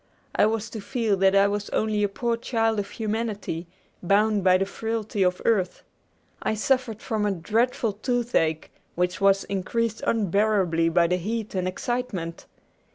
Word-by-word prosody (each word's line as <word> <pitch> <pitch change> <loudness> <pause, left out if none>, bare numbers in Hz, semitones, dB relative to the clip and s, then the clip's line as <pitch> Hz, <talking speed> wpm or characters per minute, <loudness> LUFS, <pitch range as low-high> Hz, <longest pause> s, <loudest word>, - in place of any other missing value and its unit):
I 210 - +4
was 220 0 -2
to 220 - -6
feel 225 -2 0
that 190 +1 +4
I 200 0 +6
was 205 0 -2
only 215 -1 0
a 205 - +2
poor 235 +3 -1
child 225 -2 0
of 200 0 -3
humanity, 210 -6 -3 0.3
bound 205 +2 +2
by 185 0 +5
the 195 - 0
frailty 220 0 -3
of 180 -1 +1
earth. 195 -6 +1 0.6
I 220 - 0
suffered 235 -1 0
from 220 -3 -1
a 205 - +2
dreadful 225 +5 0
toothache, 220 - 0 0.2
which 180 +2 -1
was 195 0 +4
increased 215 +3 -2
unbearably 200 -5 +2
by 170 +1 +3
the 180 +2 +1
heat 215 +4 -3
and 185 -1 -1
excitement. 190 -4 -3
210 Hz, 160 wpm, -25 LUFS, 185-225 Hz, 0.6 s, I